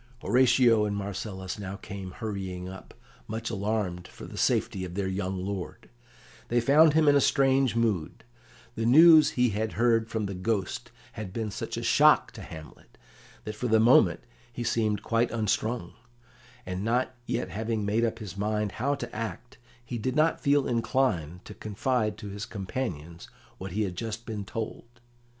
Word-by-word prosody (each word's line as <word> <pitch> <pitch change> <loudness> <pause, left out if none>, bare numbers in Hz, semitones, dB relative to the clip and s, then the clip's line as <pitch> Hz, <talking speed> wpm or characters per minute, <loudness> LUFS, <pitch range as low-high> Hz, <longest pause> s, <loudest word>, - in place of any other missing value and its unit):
Horatio 125 -3 +4
and 100 -1 -2
Marcellus 100 -1 -5
now 95 -1 -5
came 95 -1 -8
hurrying 95 -4 -5
up, 95 +1 -11 0.3
much 115 +1 -4
alarmed 100 -4 -2
for - - -11
the - - -10
safety 95 - 0
of 90 -1 -6
their 100 -1 -1
young 95 0 -2
lord. 95 -10 -6 0.6
They 120 - +2
found 145 +5 +5
him 160 -1 +4
in 145 - +6
a 140 - +5
strange 135 -4 +3
mood. 110 -9 -1 0.5
The 115 -1 -1
news 155 +4 +8
he 125 0 +4
had 110 +1 -2
heard 115 0 +2
from 110 -1 -2
the 100 - -4
Ghost 100 +4 -2 0.2
had 105 -4 -7
been 110 0 -3
such - - -5
a - - -4
shock - - +5
to - - -10
Hamlet 80 -2 -12 0.5
that 105 - -5
for 115 +4 -3
the 110 -1 +4
moment 105 -7 +5 0.3
he 120 +1 -5
seemed 110 -3 0
quite 115 +1 +1
unstrung, 110 -2 -1 0.7
and, 90 +1 -4
not 125 +3 0
having 115 -2 -2
yet - - -3
made 110 +3 +1
up 115 -1 0
his 105 -5 -8
mind 105 0 -1
how 140 +4 -1
to - - -7
act, 115 +3 -6 0.3
he 120 -1 -4
did 130 +5 -2
not 155 +2 +2
feel 140 -2 +3
inclined 115 - 0
to - - -9
confide 110 +1 -1
to 105 - -8
his 100 +1 -6
companions 90 - -5 0.3
what 95 -1 -6
he 105 +2 0
had 95 -3 -3
just 115 +3 -5
been 105 -3 -5
told. 115 +3 -5
110 Hz, 170 wpm, -28 LUFS, 100-120 Hz, 0.7 s, news